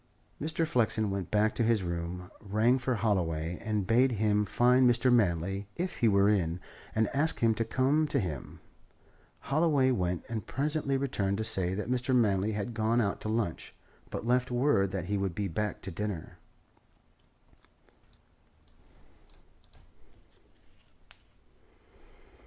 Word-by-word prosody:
Mr. 160 +2 0
Flexen 110 -8 +1
went 95 -3 -4
back 105 +1 +2
to - - -2
his 115 -3 +2
room, 85 +1 -5
rang 110 +6 +2
for 125 0 -1
Holloway, 85 -6 -1
and 105 -3 -1
bade 125 +5 +3
him 105 -1 +1
find 125 +4 +4
Mr. 120 +1 +3
Manley, 95 -2 +1
if 180 +2 -3
he 120 - +2
were 100 -1 +4
in, 90 -5 +1 0.4
and 110 -1 +2
ask 150 +4 +1
him 115 -1 +3
to 115 - -1
come 135 +7 +1
to 145 -2 0
him. 80 - -5 0.8
Holloway 140 -3 +2
went, 90 -7 -1
and 110 -4 -5
presently 140 0 0
returned 100 -8 -1
to 110 - -2
say 95 -4 +2
that 105 - -4
Mr. 125 +1 0
Manley 105 -3 +2
had 105 +3 -4
gone 110 +1 +1
out 100 -4 -1
to 110 - -4
lunch, 110 -7 -3 0.3
but - - -5
left 125 +1 +1
word 120 -6 +2
that 95 -3 -4
he 100 +2 -1
would 95 -3 -2
be 100 -1 -2
back 105 +4 -3
to 95 - -5
dinner. 100 -2 -5
110 Hz, 140 wpm, -30 LUFS, 95-125 Hz, 0.8 s, find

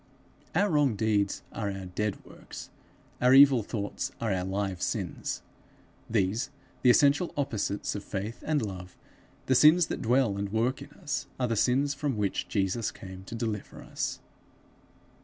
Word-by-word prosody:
Our 205 - +4
wrong 145 -6 +3
deeds 105 -2 0
are 105 -3 -3
our 95 -1 -6
dead 100 +3 -3
works; - - -11 0.5
our 125 +1 +6
evil 135 -3 +8
thoughts 105 -1 -4
are 110 -4 0
our 90 -1 -1
live 95 -1 -2
sins. - - -3 0.7
These, 110 +2 +1 0.3
the 125 - +5
essential 145 +7 +4
opposites 110 -7 -1
of 105 - -5
faith 105 +4 -5
and 150 -5 +1
love, 90 -2 -8 0.5
the 130 - +2
sins 155 +6 +7
that - - -3
dwell 120 -3 +2
and 100 0 -2
work 120 +5 0
in 140 - -9
us, 150 -3 -4
are 125 - +1
the 115 - 0
sins 135 +6 +2
from 140 -4 -2
which 100 -2 -1
Jesus 100 +2 0
came 95 0 -10
to 115 - -7
deliver 110 -3 -4
us. - - -3
110 Hz, 155 wpm, -29 LUFS, 100-135 Hz, 0.7 s, evil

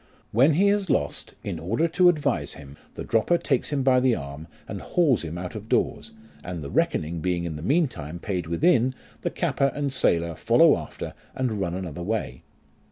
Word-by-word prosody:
When 135 +8 +5
he 195 +6 +4
has 200 -3 +1
lost, 75 - -1
in 85 - -4
order 115 - 0
to 180 +2 +5
advise 155 -4 0
him, 70 -2 -11 0.2
the - - -5
dropper 115 +10 +2
takes 135 -6 0
him 140 -2 0
by 130 -1 +5
the 125 -2 +3
arm, 70 +3 -7 0.2
and - - -6
hauls 155 - +2
him 85 0 -5
out 90 0 -5
of 110 0 -8
doors, - - 0 0.3
and 85 -3 -5
the 70 - -6
reckoning 80 +2 0
being 90 +1 -1
in 85 -2 -4
the 75 - -7
meantime 90 - 0
paid 90 -2 -3
within, 130 - +3 0.3
the - - -1
capper 140 0 0
and 145 -2 -2
sailor 85 -8 +1
follow - - +5
after - - -6 0.2
and 120 -6 -1
run 85 -2 -1
another 90 -3 -5
way. 95 - -3
110 Hz, 190 wpm, -25 LUFS, 85-140 Hz, 0.3 s, When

